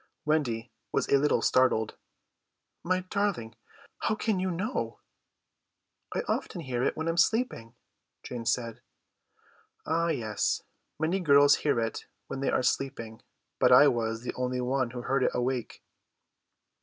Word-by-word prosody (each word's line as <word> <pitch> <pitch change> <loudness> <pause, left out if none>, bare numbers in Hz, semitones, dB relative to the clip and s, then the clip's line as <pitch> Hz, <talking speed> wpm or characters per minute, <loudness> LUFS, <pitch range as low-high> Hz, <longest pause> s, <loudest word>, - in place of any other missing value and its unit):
Wendy 130 -7 0 0.2
was - - 0
a 140 - +5
little 150 +1 +2
startled. 125 -4 +2 0.9
"My 185 +1 +1
darling, 185 - -2 0.5
how 215 - 0
can 215 -3 0
you 185 0 0
know?" 195 +8 -3 1.1
"I - - -1
often 175 - -2
hear 125 -5 -3
it - - 0
when 160 - -2
I - - +2
am 165 - -5
sleeping," 170 - +1 0.5
Jane 120 -2 -6
said. 115 -3 -1 1.0
"Ah 165 +2 +1
yes, 110 -10 -1 0.4
many 165 +5 +1
girls 145 -4 +6
hear 145 -5 +1
it 115 -1 -3 0.2
when 135 - -6
they 135 - 0
are - - +1
sleeping, 115 -4 -2 0.4
but - - +4
I 145 - +9
was 115 -1 -1
the - - -4
only 125 0 -2
one 130 0 0
who 120 0 -7
heard 135 +2 +1
it - - +1
awake." 125 -1 -2
135 Hz, 145 wpm, -29 LUFS, 120-165 Hz, 1.1 s, I